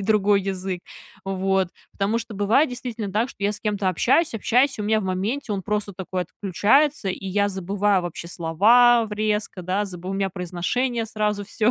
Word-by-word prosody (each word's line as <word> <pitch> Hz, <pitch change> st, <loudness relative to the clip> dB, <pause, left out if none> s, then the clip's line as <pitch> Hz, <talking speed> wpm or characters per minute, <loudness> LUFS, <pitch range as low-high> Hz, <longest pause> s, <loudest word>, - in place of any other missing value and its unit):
и -, -, -4 dB
другой 205 Hz, -1 st, +3 dB
язык. 190 Hz, -1 st, -3 dB, 0.4 s
Вот. 190 Hz, -1 st, 0 dB, 0.2 s
Потому 205 Hz, +3 st, 0 dB
что 230 Hz, -1 st, -7 dB
бывает 220 Hz, +9 st, +2 dB
действительно, 240 Hz, -4 st, -5 dB
да, 215 Hz, +6 st, 0 dB
что -, -, -13 dB
я 205 Hz, -, +2 dB
с 210 Hz, -, -7 dB
кем-то 205 Hz, -3 st, 0 dB
общаюсь, 265 Hz, -, +2 dB
общаюсь, 250 Hz, +4 st, +2 dB
и -, -, -3 dB
у -, -, -2 dB
меня 220 Hz, +1 st, +2 dB
в -, -, -5 dB
моменте 210 Hz, +7 st, -2 dB
он 195 Hz, -, -2 dB
просто 210 Hz, 0 st, -2 dB
такой 185 Hz, 0 st, -3 dB
отключается, 220 Hz, -, +1 dB
и 195 Hz, -, -6 dB
я 205 Hz, +2 st, +1 dB
забываю 195 Hz, +1 st, +1 dB
вообще 175 Hz, -1 st, -6 dB
слова 225 Hz, +9 st, +4 dB
в 210 Hz, -, -8 dB
резко, 210 Hz, -2 st, -1 dB
да, 185 Hz, +4 st, -1 dB
забу 180 Hz, -2 st, -8 dB
у 195 Hz, -, -2 dB
меня 195 Hz, -1 st, -1 dB
произношение 210 Hz, +7 st, -2 dB
сразу 210 Hz, -2 st, -2 dB
всё 215 Hz, +3 st, +1 dB
205 Hz, 195 wpm, -23 LUFS, 190-225 Hz, 0.4 s, слова